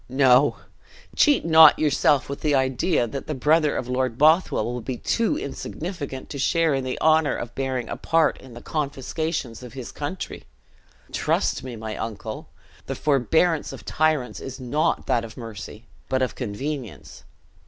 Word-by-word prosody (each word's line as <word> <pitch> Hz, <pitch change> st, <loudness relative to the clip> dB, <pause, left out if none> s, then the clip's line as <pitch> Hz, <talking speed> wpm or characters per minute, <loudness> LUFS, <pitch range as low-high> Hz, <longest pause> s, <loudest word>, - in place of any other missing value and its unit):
No! 130 Hz, +1 st, +4 dB, 0.6 s
cheat 290 Hz, -, +4 dB
not 160 Hz, -2 st, +8 dB
yourself 145 Hz, -2 st, +2 dB
with 140 Hz, -, -6 dB
the 150 Hz, -2 st, +2 dB
idea 130 Hz, +2 st, +1 dB
that 135 Hz, +4 st, -6 dB
the 155 Hz, -, -3 dB
brother 150 Hz, +3 st, +2 dB
of 125 Hz, -, -3 dB
Lord 125 Hz, -2 st, -1 dB
Bothwell 155 Hz, -5 st, +4 dB
will 120 Hz, +1 st, -4 dB
be 125 Hz, +2 st, -4 dB
too 230 Hz, -, 0 dB
insignificant 145 Hz, -1 st, -6 dB
to 140 Hz, -, -5 dB
share 165 Hz, +2 st, +2 dB
in 135 Hz, -1 st, -1 dB
the 130 Hz, 0 st, -3 dB
honor 160 Hz, -1 st, +3 dB
of 120 Hz, -, -6 dB
bearing 130 Hz, -3 st, -2 dB
a -, -, -4 dB
part 165 Hz, -1 st, +1 dB
in 130 Hz, -3 st, -13 dB
the 120 Hz, -, -10 dB
confiscations 140 Hz, -3 st, -3 dB
of 125 Hz, -2 st, -10 dB
his 130 Hz, -3 st, -7 dB
country! 150 Hz, +6 st, -6 dB, 0.7 s
Trust -, -, 0 dB
me, 130 Hz, -2 st, -6 dB
my 110 Hz, -1 st, -6 dB
uncle, 110 Hz, 0 st, -6 dB, 0.4 s
the -, -, -3 dB
forbearance 155 Hz, +3 st, +1 dB
of -, -, -10 dB
tyrants 155 Hz, -5 st, 0 dB
is 135 Hz, 0 st, -7 dB
not 130 Hz, +5 st, 0 dB
that 115 Hz, -, +1 dB
of 115 Hz, -1 st, -10 dB
mercy, 110 Hz, -2 st, -9 dB, 0.2 s
but 130 Hz, 0 st, +1 dB
of 130 Hz, -, -1 dB
convenience. 130 Hz, +2 st, -6 dB
135 Hz, 165 wpm, -24 LUFS, 125-155 Hz, 0.7 s, not